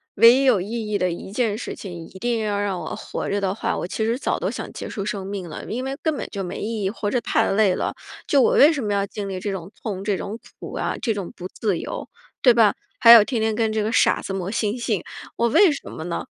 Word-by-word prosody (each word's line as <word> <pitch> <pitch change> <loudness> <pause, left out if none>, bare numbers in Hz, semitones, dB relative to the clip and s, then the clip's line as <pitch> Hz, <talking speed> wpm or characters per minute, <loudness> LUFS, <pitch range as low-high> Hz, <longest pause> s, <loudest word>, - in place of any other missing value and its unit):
唯 230 +3 +8
一 270 +2 +2
有 240 -8 +4
意 220 +2 -4
义 205 - +1
的 185 -2 0
1 175 +3 -7
件 220 -2 0
事 - - -5
情， 175 -4 -8
一 190 - -13
定 235 +1 0
要 205 -2 -1
让 200 -3 -1
我 - - -5
活 - - -5
着 200 0 0
的 190 -1 0
话， - - -2
我 - - -3
其 220 +4 -2
实 230 +2 0
早 - - -1
都 - - -1
想 - - -6
结 - - -6
束 200 -3 -4
生 200 -2 -3
命 195 -3 -5
了， 155 - -7
因 245 +4 -4
为 270 +1 -4
根 315 -2 0
本 - - -4
就 200 -2 -4
没 180 - -5
意 220 -1 -3
义。 190 - +1
活 205 0 -3
着 250 - +2
太 - - +1
累 195 -2 +3
了， - - -2 0.3
就 280 - +4
我 - - +4
为 295 +3 +7
什 280 -5 -3
么 205 -1 -1
要 200 0 +1
经 200 0 -6
历 190 -1 -4
这 200 +2 -3
种 190 -1 -6
痛、 195 -3 -4
这 200 -3 0
种 220 +3 -6 0.2
苦 - - -8
啊、 - - -1
这 225 - +1
种 200 -4 -5
不 180 - -6
自 205 -6 -1
由， - - -6 0.3
对 250 - +7
吧？ 225 -3 +4 0.2
还 230 -2 +9
有 230 -3 +11
天 230 0 -2
天 220 0 +1
跟 220 -1 +1
这 215 -1 0
个 215 - -1
傻 - - +3
子 195 - -5
磨 190 -1 -3
心 225 +1 -1
性， 215 -6 -1 0.3
我 235 - +2
为 390 - +6
什 285 - -6
么 160 - -7
呢？ 170 -1 -3
210 Hz, 295 characters per minute, -23 LUFS, 195-230 Hz, 0.3 s, 有